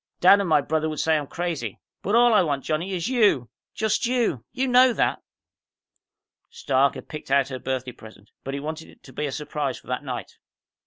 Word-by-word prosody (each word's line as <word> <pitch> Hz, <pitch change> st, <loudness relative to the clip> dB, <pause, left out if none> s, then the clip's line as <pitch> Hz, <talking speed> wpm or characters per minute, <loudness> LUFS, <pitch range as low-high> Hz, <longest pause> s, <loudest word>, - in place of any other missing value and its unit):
"Dad 190 Hz, +3 st, +7 dB
and 195 Hz, -3 st, -1 dB
my 150 Hz, -2 st, +4 dB
brother 155 Hz, +2 st, -1 dB
would 155 Hz, -, -5 dB
say 160 Hz, 0 st, +2 dB
I'm 150 Hz, -2 st, -2 dB
crazy. 160 Hz, -, -4 dB, 0.2 s
But 205 Hz, -, 0 dB
all 240 Hz, 0 st, +6 dB
I 210 Hz, -, +6 dB
want, 145 Hz, -6 st, -1 dB
Johnny, 165 Hz, +5 st, -2 dB
is 175 Hz, +2 st, -2 dB
you. 210 Hz, -, +2 dB, 0.3 s
Just 220 Hz, +2 st, 0 dB
you! 235 Hz, -, 0 dB
You 265 Hz, +2 st, -1 dB
know 250 Hz, 0 st, +6 dB
that." -, -, 0 dB, 1.3 s
Stark 135 Hz, 0 st, +1 dB
had -, -, -9 dB
picked 150 Hz, -, -8 dB
out 135 Hz, 0 st, +3 dB
her 130 Hz, -1 st, -5 dB
birthday 130 Hz, -1 st, -3 dB
present, 110 Hz, -3 st, -15 dB
but 135 Hz, +1 st, -4 dB
he -, -, -3 dB
wanted 155 Hz, +2 st, -6 dB
it -, -, -20 dB
to 130 Hz, -, -14 dB
be 150 Hz, +4 st, -2 dB
a -, -, -4 dB
surprise 145 Hz, -1 st, -3 dB
for -, -, -17 dB
that 125 Hz, +3 st, -3 dB
night. 125 Hz, -3 st, -6 dB
150 Hz, 210 wpm, -24 LUFS, 135-200 Hz, 1.3 s, Dad